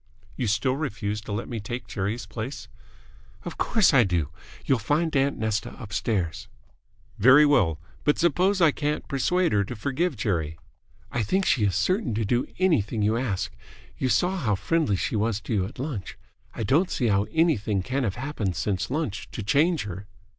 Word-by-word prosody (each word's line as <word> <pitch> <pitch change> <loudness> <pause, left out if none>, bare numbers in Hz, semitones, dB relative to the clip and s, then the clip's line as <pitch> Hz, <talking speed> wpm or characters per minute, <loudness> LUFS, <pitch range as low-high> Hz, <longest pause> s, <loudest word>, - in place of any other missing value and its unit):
"You 120 - -2
still 130 +5 +1
refuse 105 -8 -3
to 105 - -8
let 105 +3 -3
me 120 -2 -4
take 120 +4 -5
Jerry's 105 +3 -3
place?" 115 +5 -6 0.8
"Of - - -7
course 215 -8 +3
I 130 -3 +7
do. 85 -7 0 0.4
You'll 130 -3 +2
find 155 +8 0
aunt 140 +1 +2
Nesta 110 -1 -2
upstairs." 100 -4 -2 0.7
"Very 130 +7 +7
well. 85 - +3 0.2
But 150 - +2
suppose 180 +4 +2
I 165 -3 +6
can't 150 +1 -2
persuade 175 +6 +1
her 105 -1 +3
to 110 +5 -6
forgive 140 +8 -1
Jerry?" 80 -7 -1 0.5
"I 120 - 0
think 190 - +1
she 110 -6 +3
is 95 - +1
certain 185 - +1
to 110 0 0
do 120 +4 +1
anything 125 - +1
you 110 +2 +2
ask. 115 -6 -2 0.4
You 130 - +1
saw 180 - +2
how 115 - +1
friendly 155 - +1
she 95 - -2
was 110 0 0
to - - -4
you 95 -3 +1
at - - -13
lunch. 130 -7 -5 0.4
I - - -3
don't 155 - +3
see 125 - -1
how 100 0 +2
anything 115 - +1
can 135 +6 -1
have 100 -5 -1
happened 120 - -3
since 95 +1 -1
lunch 140 -6 -3
to 110 - -4
change 150 - +2
her." 100 0 -7
120 Hz, 180 wpm, -26 LUFS, 105-150 Hz, 0.8 s, I